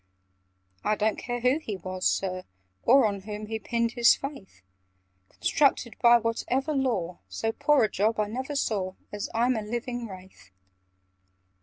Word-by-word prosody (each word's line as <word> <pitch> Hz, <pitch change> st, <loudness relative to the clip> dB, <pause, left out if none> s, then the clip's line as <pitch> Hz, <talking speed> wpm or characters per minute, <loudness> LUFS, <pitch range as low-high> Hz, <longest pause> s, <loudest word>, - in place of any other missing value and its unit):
"I 215 Hz, -, +2 dB
don't 215 Hz, +1 st, 0 dB
care 245 Hz, -1 st, -4 dB
who 255 Hz, +5 st, +3 dB
he 220 Hz, -10 st, -5 dB
was, 185 Hz, 0 st, -2 dB
Sir, 185 Hz, -1 st, -1 dB, 0.4 s
or 265 Hz, +1 st, +5 dB
On 200 Hz, -2 st, -1 dB
whom 210 Hz, +1 st, -6 dB
he 220 Hz, +1 st, -4 dB
pinned 235 Hz, +1 st, -1 dB
his 235 Hz, 0 st, +5 dB
faith! 275 Hz, -, -9 dB, 0.7 s
Constructed 270 Hz, -5 st, +1 dB
by 240 Hz, 0 st, +7 dB
whatever 245 Hz, +5 st, -1 dB
law, 225 Hz, -11 st, -1 dB
So 225 Hz, -, -2 dB
poor 290 Hz, +3 st, +3 dB
a -, -, +4 dB
job 215 Hz, +3 st, +1 dB
I 210 Hz, -, +2 dB
never 260 Hz, +7 st, -4 dB
saw, 195 Hz, -8 st, -1 dB, 0.2 s
As 205 Hz, -1 st, -4 dB
I'm 245 Hz, +2 st, +3 dB
a 220 Hz, -, -1 dB
living 240 Hz, +2 st, -4 dB
Wraith! 185 Hz, -, -13 dB
225 Hz, 155 wpm, -27 LUFS, 200-250 Hz, 0.7 s, by